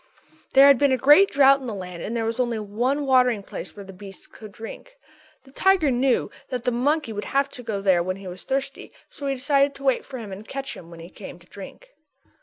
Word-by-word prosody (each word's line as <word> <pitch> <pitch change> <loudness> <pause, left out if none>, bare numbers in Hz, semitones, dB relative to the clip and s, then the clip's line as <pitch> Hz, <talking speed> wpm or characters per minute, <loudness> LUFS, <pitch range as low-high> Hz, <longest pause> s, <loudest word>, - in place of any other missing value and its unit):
_" - - -37
There 270 +1 +8
had 280 -3 +6
been 285 -1 +3
a 260 - +2
great 295 - +6
drought 275 0 +5
in 260 - -7
the 220 - -4
land 180 -3 -8
and 235 +3 -4
there 225 - -1
was 230 +2 -3
only 240 -2 0
one 240 +8 -2
watering 250 -5 +3
place - - -8
where 200 -1 -10
the 195 - -11
beasts 195 0 -12
could 215 -2 -13
drink. 225 - -11 0.5
The 265 - -19
tiger 370 -2 +2
knew 255 +1 +1 0.2
that 250 -3 -4
the 250 - 0
monkey 275 +1 0
would 205 0 -5
have 275 0 0
to 250 - -9
go 215 -4 -4
there 190 -3 +3
when 185 +2 -3
he 195 0 -12
was 180 +1 -8
thirsty 275 +1 -4 0.2
so 285 - -7
he 275 - 0
decided 280 +1 +2
to 275 - -12
wait 265 -2 +1
for 265 - -9
him 220 -5 -8
and 200 +3 -9
catch 270 0 -5
him 170 - -12
when 170 -1 -12
he 170 - -11
came 190 - -10
to 170 - -21
drink. 205 - -12
250 Hz, 250 wpm, -23 LUFS, 205-275 Hz, 0.5 s, There